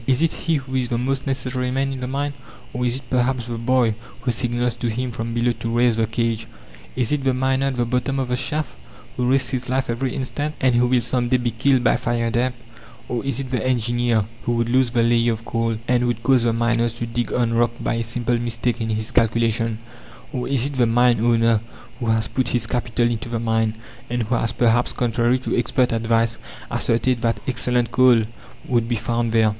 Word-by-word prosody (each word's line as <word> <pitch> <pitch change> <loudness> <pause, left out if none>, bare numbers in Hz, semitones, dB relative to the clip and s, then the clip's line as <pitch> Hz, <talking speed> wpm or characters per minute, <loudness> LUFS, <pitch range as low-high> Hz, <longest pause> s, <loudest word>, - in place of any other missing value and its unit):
Is 135 +3 +3
it 165 - +3
he 165 -1 -1
who 130 -2 -4
is 130 -2 +1
the 120 - -1
most 135 +3 -1
necessary 130 -1 -2
man 135 +1 -1
in 130 - -6
the 125 - -3
mine? 140 +2 -2 0.4
Or, 125 0 -1
is 120 - 0
it 135 - -6
perhaps 125 -1 +1
the 120 -1 -5
boy 120 -1 +2 0.3
who 125 0 0
signals 120 0 0
to 120 - -2
him 125 +3 -2
from 115 0 -4
below 120 +1 +2
to 115 +1 -2
raise 120 -1 +4
the 110 0 +1
cage? 115 0 -1 0.5
Is 125 -2 0
it 145 -2 0
the 130 -1 +2
miner 130 +1 +1
at 135 - -1
the 120 -1 0
bottom 125 +3 -1
of 130 -2 -1
the 125 - +1
shaft, 150 - -2 0.4
who 125 0 0
risks 135 0 +2
his 125 -1 -3
life 130 -1 0
every 125 +2 -2
instant, 145 +3 -3
and 130 -1 +3
who 120 +1 +3
will 125 0 +3
some 120 0 0
day 130 - +4
be 120 -1 -1
killed 125 +3 +2
by 115 - +3
fire 115 -1 -1
damp? 125 +2 0 0.5
Or 120 -2 -2
is 135 -1 0
it 130 -1 -7
the 125 -4 -1
engineer, 120 -3 +1 0.2
who 120 - -1
would 115 0 0
lose 130 0 +3
the 115 -1 +1
layer 115 0 +3
of 115 +1 -8
coal, 115 -1 -1
and 125 0 +2
would 120 -1 -2
cause 130 0 +4
the 115 - +3
miners 115 0 +1
to 120 - -3
dig 120 +1 -3
on 120 -2 +1
rock 120 0 +3
by - - -1
a 115 0 -1
simple 120 +1 -1
mistake 120 0 -2
in 110 - -2
his 110 0 -2
calculations? 115 -1 +1 0.6
Or 125 - -2
is 130 -2 +1
it 140 -1 -3
the 120 -2 +4
mine 120 0 +3
owner 115 -1 +3 0.4
who 120 - -3
has 110 -1 +1
put 130 -2 -1
his 120 - +1
capital 120 -1 0
into 115 0 -3
the 115 -1 -2
mine, 115 -1 0 0.3
and 120 0 -1
who 115 +3 -2
has 115 -1 +1
perhaps, 120 0 +2
contrary 120 +1 +1
to 130 - -2
expert 125 +1 +1
advice, 115 0 +1 0.3
asserted 120 +1 +1
that 115 -1 0
excellent 125 -1 0
coal 125 -3 +5 0.4
would 120 -2 +1
be 120 - +1
found 115 +1 -1
there? 110 -1 +4
120 Hz, 225 wpm, -22 LUFS, 115-130 Hz, 0.6 s, coal